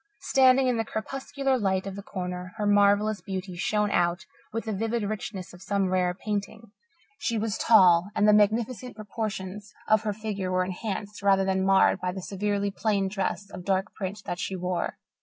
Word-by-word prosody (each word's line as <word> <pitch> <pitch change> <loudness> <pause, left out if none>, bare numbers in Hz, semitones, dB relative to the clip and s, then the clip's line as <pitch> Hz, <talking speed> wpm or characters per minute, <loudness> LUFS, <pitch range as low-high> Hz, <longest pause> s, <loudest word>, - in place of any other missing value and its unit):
Standing 260 -1 +4
in 250 -2 +1
the 225 - +1
crepuscular 270 +4 -2
light 190 -2 0
of 195 -1 -5
the 200 - -6
corner, 180 -1 -5
her 210 - -1
marvellous 205 +1 +3
beauty 190 -2 -5
shone 210 +3 0
out 175 -1 +1 0.3
with 230 +1 -3
the 220 - -2
vivid 225 +3 -1
richness 200 -3 -5
of 180 - -13
some 195 -1 0
rare 180 -1 +1
painting. 210 +2 -4 0.5
She 235 -5 -1
was 215 -1 -1
tall, 185 -5 +5
and 210 - +3
the 210 - +7
magnificent 225 +4 +1
proportions 210 -1 -5
of 215 -1 +4
her 215 -1 -1
figure 200 -3 -4
were 185 0 +2
enhanced 200 +2 -5
rather 195 -1 +3
than 190 0 +1
marred 195 0 +4
by 180 0 -1
the 190 - -6
severely 200 +1 -1
plain 200 -1 0
dress 200 0 -3
of 180 - -8
dark 190 +1 0
print 195 +1 -5
that 175 - -4
she 190 - -3
wore. 180 -1 -2
200 Hz, 185 wpm, -27 LUFS, 190-215 Hz, 0.5 s, the